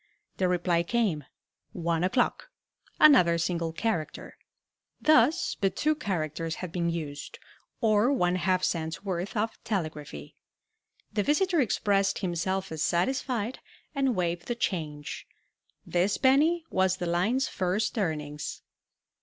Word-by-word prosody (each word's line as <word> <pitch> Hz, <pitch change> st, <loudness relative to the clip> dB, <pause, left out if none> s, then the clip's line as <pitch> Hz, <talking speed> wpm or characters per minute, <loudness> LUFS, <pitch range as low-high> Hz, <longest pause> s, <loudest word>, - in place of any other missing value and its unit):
The 185 Hz, -, +2 dB
reply 175 Hz, -1 st, +1 dB
came, 175 Hz, -, 0 dB, 0.5 s
"One 170 Hz, -1 st, -1 dB
o'clock," 245 Hz, -, 0 dB, 0.5 s
another 180 Hz, -, +7 dB
single 170 Hz, -1 st, -1 dB
character. 165 Hz, -4 st, -3 dB, 0.6 s
Thus 310 Hz, +2 st, +3 dB
but 195 Hz, -1 st, +1 dB
two 310 Hz, +1 st, +2 dB
characters 165 Hz, -, -3 dB
had 180 Hz, -3 st, -6 dB
been 170 Hz, -1 st, -1 dB
used, 150 Hz, -4 st, -5 dB, 0.4 s
or 220 Hz, +2 st, +3 dB
one 180 Hz, -9 st, +2 dB
half 185 Hz, 0 st, +1 dB
cent's 160 Hz, +1 st, -2 dB
worth 185 Hz, +2 st, -3 dB
of 220 Hz, +2 st, -2 dB
telegraphy. 155 Hz, -, -4 dB, 0.8 s
The 210 Hz, -, +1 dB
visitor 335 Hz, -, +2 dB
expressed 200 Hz, -4 st, +1 dB
himself 190 Hz, +1 st, -2 dB
as 160 Hz, -2 st, -4 dB
satisfied, 240 Hz, +6 st, 0 dB, 0.3 s
and 270 Hz, -4 st, +1 dB
waived 175 Hz, -1 st, -2 dB
the 240 Hz, -, -1 dB
"change." 155 Hz, -9 st, -4 dB, 0.6 s
This 180 Hz, +3 st, +1 dB
penny 310 Hz, +6 st, +3 dB
was 190 Hz, 0 st, +2 dB
the 180 Hz, -, -3 dB
line's 185 Hz, +10 st, +1 dB
first 190 Hz, +5 st, -1 dB
earnings. 150 Hz, -5 st, -3 dB
185 Hz, 120 wpm, -28 LUFS, 170-230 Hz, 0.8 s, another